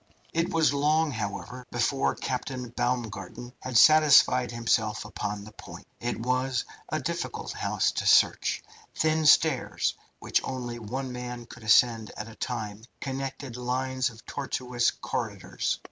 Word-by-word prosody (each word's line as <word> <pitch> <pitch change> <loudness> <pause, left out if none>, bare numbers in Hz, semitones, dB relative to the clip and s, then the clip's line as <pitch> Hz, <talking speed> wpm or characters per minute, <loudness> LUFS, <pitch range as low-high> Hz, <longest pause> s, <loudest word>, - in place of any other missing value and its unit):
It 165 +2 +1
was 160 -4 +3
long, 150 +2 +2
however, 110 +2 -5
before 120 +3 +1
Captain 125 -1 -4
Baumgarten 120 -1 -3
had 130 -2 0
satisfied 140 -4 +6
himself 110 -3 0
upon 105 -1 -4
the 105 - -11
point. 105 - -11
It 120 -1 -3
was 130 0 0 0.2
a - - -1
difficult - - -4
house - - 0
to - - -2
search. - - +4 0.3
Thin 155 0 +2
stairs, - - +4 0.2
which - - 0
only 120 -2 -4
one 125 +4 -4
man 125 -1 -6
could - - -13
ascend 110 0 +4
at 105 - -5
a 115 - -10
time, 110 -3 -4 0.2
connected 135 -2 -5
lines 130 +1 -1
of 115 -1 -15
tortuous 125 -3 -1
corridors. - - -3
125 Hz, 135 wpm, -28 LUFS, 115-135 Hz, 0.3 s, satisfied